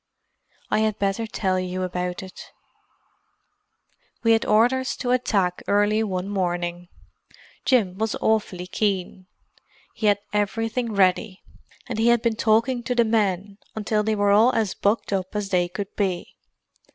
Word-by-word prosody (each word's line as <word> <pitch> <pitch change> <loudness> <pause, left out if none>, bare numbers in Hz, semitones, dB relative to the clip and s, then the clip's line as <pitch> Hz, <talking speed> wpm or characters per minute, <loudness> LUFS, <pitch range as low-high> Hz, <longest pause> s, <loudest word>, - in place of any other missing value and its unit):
"I - - +3
had 215 -1 +1
better 200 +3 -1
tell 190 -3 -1
you 185 0 -3
about 180 0 -3
it. 190 - -10 1.8
"We 230 - +4
had 225 0 +3
orders 245 +5 +2
to 245 - -2
attack 200 -8 +1
early 205 +2 +2
one 190 -3 -2
morning. 175 -3 -2 0.8
Jim 205 -8 +2
was 220 0 -1
awfully 205 -5 0
keen; 185 -1 -2 0.7
he 215 - -1
had 205 -1 +4 0.2
everything 225 +3 -1
ready, 190 +1 +1 0.4
and 230 -3 -4
he 225 - +3
had 235 -1 +4
been 230 -2 +1
talking 230 +3 +2
to 250 +1 -2
the 235 -1 +4
men 205 -2 0 0.2
until 215 0 0
they 215 +1 0
were 205 -1 +2
all 220 +5 +5
as 220 -4 0
bucked 205 0 0
up 190 +1 -3
as 205 -2 -2
they 180 -2 +2
could 195 +2 -6
be. 190 -4 -2
205 Hz, 150 wpm, -24 LUFS, 185-225 Hz, 1.8 s, all